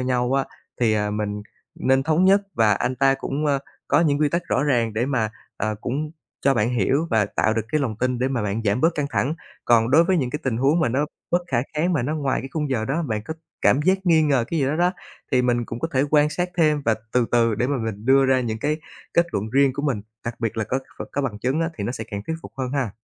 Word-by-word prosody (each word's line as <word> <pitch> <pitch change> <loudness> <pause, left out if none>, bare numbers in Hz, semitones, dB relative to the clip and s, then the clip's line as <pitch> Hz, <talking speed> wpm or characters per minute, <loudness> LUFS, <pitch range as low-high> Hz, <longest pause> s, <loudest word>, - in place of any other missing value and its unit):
nhau 125 0 0
á, 135 0 +2 0.4
thì, 115 -2 +3
à, 105 -1 0
mình 105 0 -3 0.4
nên 135 0 +3
thống 160 +5 +2
nhất, 195 +2 +6
và 110 -2 +4
anh 125 +5 -1
ta 135 +1 +4
cũng, 140 +2 -3
ơ, 140 -1 +2 0.3
có 145 - +4
những 150 -3 +2
quy 150 - +4
tắc 170 +4 -1
rõ 135 - +2
ràng 120 -6 +1
để 120 +4 0
mà, 115 -6 0 0.3
à, 110 +1 -1
cũng 150 +5 -3 0.3
cho 135 0 +4
bạn 115 +1 +1
hiểu 130 - +1
và 110 -3 +3
tạo 110 +2 0
được 115 - 0
cái 155 - +2
lòng 115 -6 -2
tin 125 0 0
để 130 - +1
mà 125 -5 -1
bạn 105 +2 -2
giảm 105 +4 +1
bớt 165 +1 +3
căng 145 -1 -1
thẳng. 145 +3 0 0.3
Còn 115 0 +4
đối 160 +5 +6
với 185 +2 +2
những 130 -6 0
cái 150 - -3
tình 125 -4 -1
huống 140 +7 +2
mà 160 - +2
nó 140 +5 0 0.2
bất 175 +1 +2
khả 125 -6 0 0.2
kháng 170 +4 +1
mà 150 - +1
nó 145 +6 -1
ngoài 140 -3 0
cái 135 - -7
khung 150 -3 -2
giờ 110 -4 0
đó, 145 +7 -1
bạn 110 -8 -2
có 160 - -5 0.3
cảm 145 - +4
giác 190 +3 +3
nghi 160 -2 +5
ngờ 135 -6 +2
cái 165 -3 0
gì 135 - +2
đó 145 +3 0
đó, 175 +2 +2 0.4
thì 125 -1 +4
mình 120 -1 +1
cũng 115 - -6
có 165 - -1
thể 130 - +4
quan 150 0 +4
sát 180 +2 -1
thêm, 155 -3 +3
và 110 - +3 0.2
từ 125 -2 +2
từ 115 -2 +3
để 120 - 0
mà 140 +1 0
mình 105 -1 -5
đưa 135 0 +5
ra 130 -1 +3
những 110 -3 -3
cái 150 +5 0 0.4
kết 170 - +4
luận 105 +2 -2
riêng 135 0 +4
của 140 +2 -4
mình, 135 -8 0 0.2
đặc 115 0 -3
biệt 115 -1 -2
là 110 - 0
có 130 - -1
kh 135 - -10
có 145 - -1
bằng 115 -6 -3
chứng 130 +8 0
á 165 +1 0
thì 100 - -2
nó 120 - -2
sẽ 110 - -5
càng 100 0 -4
thuyết 160 - -2
phục - - -10
hơn 130 -2 -3
ha. 135 -6 0
130 Hz, 280 wpm, -23 LUFS, 115-150 Hz, 0.4 s, nhất